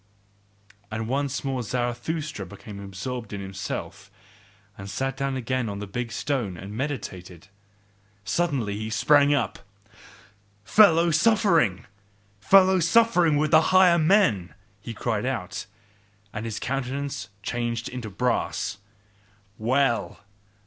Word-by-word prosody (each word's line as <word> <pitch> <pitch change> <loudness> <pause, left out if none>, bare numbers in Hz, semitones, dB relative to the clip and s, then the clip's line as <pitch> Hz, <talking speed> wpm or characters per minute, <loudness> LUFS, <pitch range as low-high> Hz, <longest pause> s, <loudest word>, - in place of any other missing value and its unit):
And 110 0 -4
once 140 +2 -1
more 135 -2 -2
Zarathustra 120 +3 -3
became 100 0 -10
absorbed 105 +4 -6
in 100 - -4
himself, 95 0 -6 0.7
and 95 +1 -9
sat 135 +7 -2
down 135 0 -2
again 130 -1 -2
on 100 - -5
the 105 - -5
big 115 +4 -4
stone 120 -7 -2
and 100 +4 -8
meditated. 100 - -6 0.8
Suddenly 125 -5 0
he 110 +1 -4
sprang 145 +6 +4
up, 115 -8 -2 1.0
"FELLOW 170 - +5
SUFFERING! 165 - +3 0.5
FELLOW 190 - +5
SUFFERING 175 -3 +4
WITH 150 0 +1
THE 160 - +7
HIGHER 185 0 +5
MEN!" 155 - +2 0.2
he 115 +3 -8
cried 110 0 -2
out, 100 -9 -4 0.7
and 105 +2 -5
his 115 -2 -4
countenance 135 +1 -3
changed 120 0 -2
into 125 -3 -6
brass. 105 -2 -1 0.8
"Well! 120 +1 0
125 Hz, 115 wpm, -25 LUFS, 105-145 Hz, 1.0 s, THE